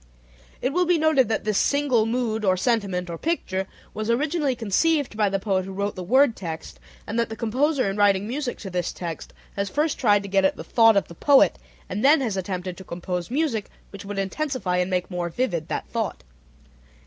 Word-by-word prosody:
It 260 - 0
will 360 +1 +2
be 350 -1 +4
noted 305 -7 +3
that 220 - -1
this 215 -1 +1
"single 275 -6 +2
mood, 225 -2 -1
or 185 -2 +3
sentiment, 195 -5 0
or 170 -1 -6
picture" 195 - -2 0.3
was 215 +1 -4
originally 285 +2 +1
conceived 255 - +1
by 210 -2 +2
the 195 - 0
poet 190 -1 0
who 190 +1 -7
wrote 200 +1 -2
the 185 - -5
word 250 +6 +4
text, 165 -4 -7 0.3
and 230 - -2
that 230 - 0
the 220 - -5
composer 255 +5 +1
in 195 +1 -2
writing 200 -1 +3
music 255 +1 -3
to 195 - -7
this 180 -1 -1
text 170 -3 -6 0.2
has 200 0 -2
first 300 +4 0
tried 205 -5 +3
to - - -6
get 195 0 +2
at 190 - +3
the - - -8
thought 225 +4 +5
of 200 - +1
the - - -11
poet, 275 - +4 0.3
and 200 +3 -3
has 270 -6 +4
then 190 - -1
attempted 185 -1 -5
to 190 - -9
compose 180 0 -4
music 260 -6 -1 0.2
which 200 - -9
would 205 0 -6
intensify 195 -1 -1
and 180 +1 0
make 180 0 -1
more 175 -1 -2
vivid 170 -5 -2
that - - -3
thought. - - -3
210 Hz, 210 wpm, -24 LUFS, 190-260 Hz, 0.3 s, thought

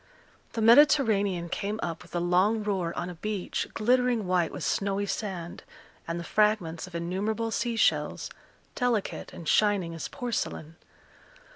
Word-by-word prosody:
The 225 - -1
Mediterranean 220 - +5
came 205 +5 -3
up 165 -2 -4
with 175 - -12
a - - +1
long 185 +5 +2
roar 190 -5 -1
on 175 - -2
a 180 - -6
beach 210 -3 -2
glittering 245 -1 +2
white 180 -2 +1
with - - -6
snowy 200 0 0
sand, 190 -5 -4 0.5
and 165 +1 -3
the - - -5
fragments 185 -3 +1
of 180 - -11
innumerable 205 +7 -2
sea 235 +1 -1
shells, - - +1 0.4
delicate 240 -5 -1
and 165 - -9
shining 200 -4 +2
as 165 - -5
porcelain. 240 - -4
200 Hz, 145 wpm, -28 LUFS, 175-220 Hz, 0.5 s, Mediterranean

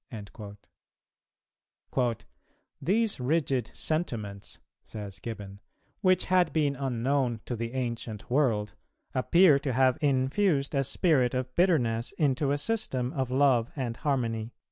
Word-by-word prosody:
"[268:1] 120 -4 0 0.6
"These 215 +1 +1
rigid 130 -3 0
sentiments," 110 - -3 0.2
says 100 -3 -8
Gibbon, 100 -4 -7 0.4
"which 185 -2 +3
had 180 -3 +3
been 145 -3 +1
unknown 130 -1 0
to 120 - -3
the 115 +1 -4
ancient 115 -4 -4
world, 120 -6 +1 0.4
appear 155 +3 +5
to 135 -2 -2
have 130 0 +3
infused 140 +3 +1
a 135 -1 +2
spirit 135 -3 +2
of 130 0 -3
bitterness 125 -11 +2
into 140 -2 +1
a 145 - +1
system 145 - -1
of 130 -2 -2
love 130 -3 +3
and 125 -5 -3
harmony." 115 -5 -1
130 Hz, 120 wpm, -28 LUFS, 115-150 Hz, 0.6 s, appear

